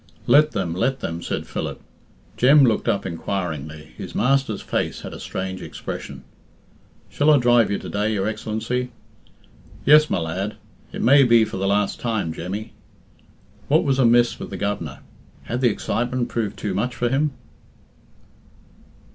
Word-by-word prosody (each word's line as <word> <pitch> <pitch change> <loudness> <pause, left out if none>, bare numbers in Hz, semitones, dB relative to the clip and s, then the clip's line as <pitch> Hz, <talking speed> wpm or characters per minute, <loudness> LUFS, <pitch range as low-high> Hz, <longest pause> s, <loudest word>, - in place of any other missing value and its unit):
"Let 150 +2 +5
them 95 -5 -2
let 130 +9 -1
them," 85 0 -4
said - - -3
Philip. - - -5 0.6
Jem 135 +6 +6
looked 115 -4 +2
up 100 - 0
inquiringly. 80 -4 -4
His - - -8
master's 135 -4 +1
face - - -2
had - - -8
a - - -8
strange 95 0 -5
expression. - - -7 0.8
"Shall 145 +2 +1
I 150 - +7
drive 120 -3 +4
you 100 - 0
to - - -8
day, 105 +2 -1
your 100 -1 -1
Excellency?" 110 +3 -3 1.0
"Yes, 150 +1 +6
my - - +1
lad. 90 +5 -3 0.4
It - - -4
may 140 +4 +7
be 115 -3 +5
for 105 - -6
the 95 +1 -1
last 100 0 +1
time, 110 -9 -2
Jemmy." 100 +7 -6 0.9
What 155 +5 +3
was 135 -3 +1
amiss 120 -1 +4
with - - -6
the - - -6
Governor? 95 -9 -3 0.4
Had 120 +2 -3
the 125 - +4
excitement 120 +3 -2
proved 110 -4 -3
too 100 - -3
much 120 +6 -1
for 120 - 0
him? 140 +3 +1
110 Hz, 155 wpm, -22 LUFS, 95-125 Hz, 1.0 s, I